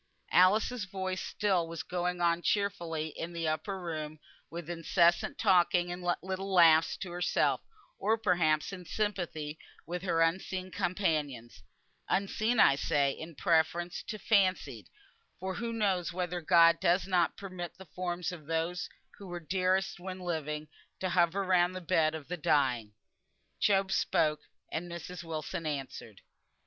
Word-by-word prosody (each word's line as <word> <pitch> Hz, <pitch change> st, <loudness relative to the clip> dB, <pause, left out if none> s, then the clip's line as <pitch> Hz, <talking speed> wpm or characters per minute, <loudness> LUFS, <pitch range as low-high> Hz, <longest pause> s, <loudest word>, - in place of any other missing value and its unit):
Alice's 210 Hz, +5 st, +4 dB
voice 190 Hz, -1 st, -3 dB
still 190 Hz, -5 st, 0 dB
was 165 Hz, -5 st, -5 dB
going 180 Hz, +1 st, -2 dB
on 170 Hz, 0 st, +2 dB
cheerfully 170 Hz, -6 st, -1 dB
in 165 Hz, +3 st, -6 dB
the 165 Hz, -1 st, -2 dB
upper 155 Hz, +5 st, -2 dB
room 155 Hz, -3 st, -5 dB, 0.3 s
with 170 Hz, -1 st, -7 dB
incessant 170 Hz, +1 st, +2 dB
talking 175 Hz, -3 st, +3 dB
and 180 Hz, +1 st, -6 dB, 0.2 s
little 190 Hz, +1 st, -4 dB
laughs 165 Hz, -3 st, +5 dB
to 180 Hz, -, -6 dB
herself, 175 Hz, 0 st, +1 dB, 0.4 s
or 220 Hz, +1 st, +2 dB
perhaps 175 Hz, -6 st, +1 dB
in 185 Hz, -2 st, -7 dB
sympathy 170 Hz, -6 st, -3 dB, 0.3 s
with 175 Hz, +1 st, -4 dB
her 175 Hz, -3 st, +1 dB
unseen 185 Hz, +2 st, -2 dB
companions; 155 Hz, -, -2 dB, 0.5 s
"unseen," 215 Hz, +4 st, +1 dB
I 140 Hz, -, +6 dB
say, 140 Hz, -1 st, +2 dB
in 160 Hz, +3 st, -9 dB
preference 170 Hz, +1 st, +1 dB
to 215 Hz, -, -4 dB
"fancied," 195 Hz, -3 st, +1 dB, 0.5 s
for 190 Hz, +1 st, -3 dB
who 235 Hz, +3 st, -3 dB
knows 195 Hz, -6 st, 0 dB
whether 180 Hz, 0 st, -3 dB
God 165 Hz, 0 st, +6 dB
does 180 Hz, +1 st, +2 dB
not 180 Hz, -3 st, +1 dB
permit 185 Hz, -3 st, -7 dB
the 190 Hz, -, -11 dB
forms 180 Hz, +1 st, -3 dB
of 160 Hz, -5 st, -10 dB
those 165 Hz, +2 st, -2 dB, 0.3 s
who 200 Hz, -, -9 dB
were 175 Hz, -1 st, -5 dB
dearest 185 Hz, +2 st, 0 dB
when 185 Hz, +1 st, -6 dB
living, 155 Hz, -4 st, -3 dB, 0.3 s
to 185 Hz, -, -1 dB
hover 175 Hz, +2 st, +2 dB
round 180 Hz, -1 st, +3 dB
the -, -, -3 dB
bed 160 Hz, -3 st, +1 dB
of 155 Hz, -3 st, -8 dB
the 180 Hz, -, -4 dB
dying? 125 Hz, -9 st, +1 dB, 0.6 s
Job 195 Hz, -1 st, +2 dB
spoke, 150 Hz, -4 st, +2 dB, 0.3 s
and 170 Hz, +2 st, -4 dB
Mrs. 170 Hz, 0 st, -7 dB
Wilson 160 Hz, 0 st, -4 dB
answered. 135 Hz, -8 st, -6 dB
175 Hz, 145 wpm, -31 LUFS, 160-185 Hz, 0.6 s, I